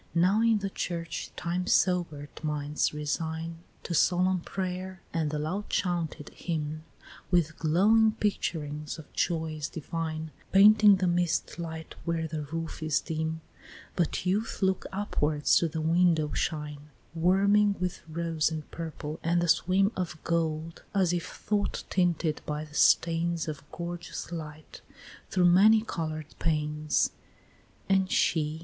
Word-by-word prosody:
Now 185 +6 +4
in 230 -1 +4
the 200 -1 -3
church, 170 -3 -4
time 180 +1 -2
sober'd 170 -8 0
minds 150 -1 0
resign 160 +2 -3 0.2
To 175 - -4
solemn 180 +2 +3
pray'r, 185 +1 -4 0.2
and 160 -2 0
the 150 - -2
loud 170 +8 -3
chaunted 170 -5 -1
hymn, 155 -2 -4 0.5
With 165 -3 +2
glowing 215 +7 +4
picturings 150 -8 -2
of 160 - -13
joys 160 -3 -1
divine 160 0 -4 0.2
Painting 210 +1 +7
the 185 -1 0
mist 175 -1 0
light 160 -1 -6
where 165 -1 -1
the 155 -1 -4
roof 165 +2 -5
is 155 -1 +1
dim; 160 0 -3 0.5
But 175 +1 0
youth 200 +3 -1
looks 190 -1 +1
upward 155 -7 -1
to 170 - +5
the 160 0 -4
window 165 -1 +2
shine, 150 -2 -3 0.2
Warming 200 +4 +3
with 180 -1 -2
rose 165 -1 0
and 155 -2 -5
purple 160 -2 -6
and 170 +1 +2
the 175 - 0
swim 185 +5 +3
Of 180 -4 -3
gold, 165 -1 -1
as 185 -3 +3
if 175 -1 -2
thought 205 -1 -2
tinted 170 -4 +1
by 150 +1 -3
the 150 - -17
stains 165 +1 +3
Of 155 -2 -5
gorgeous 175 0 -6
light 155 -2 -8 0.5
through 180 -2 +2
many 210 +5 +6
color'd 155 -6 -4
panes; 150 -1 +1 0.8
XVI. 165 -5 +2
165 Hz, 135 wpm, -28 LUFS, 155-185 Hz, 0.8 s, Painting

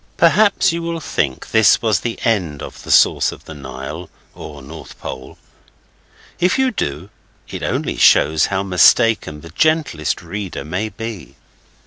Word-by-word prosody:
Perhaps 195 +1 +3
you 170 - -3
will 170 0 -3
think 70 - -3
this 110 -1 +5
was 110 -6 +1
the 115 +2 -4
end 90 -11 -1
of - - -9
the - - -12
source - - +4
of - - -13
the 80 - -9
Nile 70 +4 -8 0.2
(or 75 -2 -10
North 80 +4 -11
Pole). 65 0 -8 1.0
If 180 +7 +2
you 265 -1 +2
do, 85 - -4 0.4
it - - -7
only - - -2
shows 75 +1 +4
how 95 0 -1
mistaken 95 -2 +3
the 85 - -12
gentlest 150 - 0
reader 95 +2 -6
may 90 +7 -3
be. 110 -10 -8
95 Hz, 150 wpm, -18 LUFS, 75-120 Hz, 1.0 s, this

